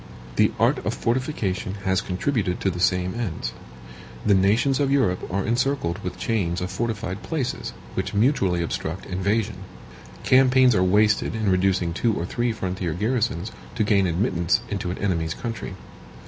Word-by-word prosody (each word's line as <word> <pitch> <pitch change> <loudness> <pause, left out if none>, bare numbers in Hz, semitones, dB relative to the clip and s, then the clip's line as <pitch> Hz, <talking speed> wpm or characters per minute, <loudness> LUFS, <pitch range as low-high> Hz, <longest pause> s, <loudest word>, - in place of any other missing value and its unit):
The - - +4
art - - +2
of - - -1
fortification 115 -7 -1
has 95 -1 +2
contributed 95 0 -1
to 95 - +1
the 90 - -6
same 90 0 +1
ends. 115 -9 -3 0.7
The 105 - +5
nations 110 +8 +3
of 140 -1 +1
Europe 110 -13 +1
are 95 +1 -1
encircled 120 -6 0
with 90 - -4
chains 90 -7 -1
of 90 0 -3
fortified 110 -4 -3
places, 145 -6 -3 0.2
which - - -2
mutually 100 - +2
obstruct 85 +1 -4
invasion. 100 +3 -1 0.7
Campaigns 130 -1 +5
are 90 - +2
wasted 105 +4 +3
in 110 -3 +1
reducing 95 -2 +2
two 110 +4 +1
or 85 - -2
three 120 +5 -1
frontier 95 -5 -3
garrisons, 105 -1 -1 0.2
to 115 - +1
gain 100 -3 +3
admittance 85 0 +1
into 100 -3 -3
an 90 - -3
enemy's 85 -5 -1
country. 115 -5 -5
100 Hz, 155 wpm, -24 LUFS, 90-115 Hz, 0.7 s, The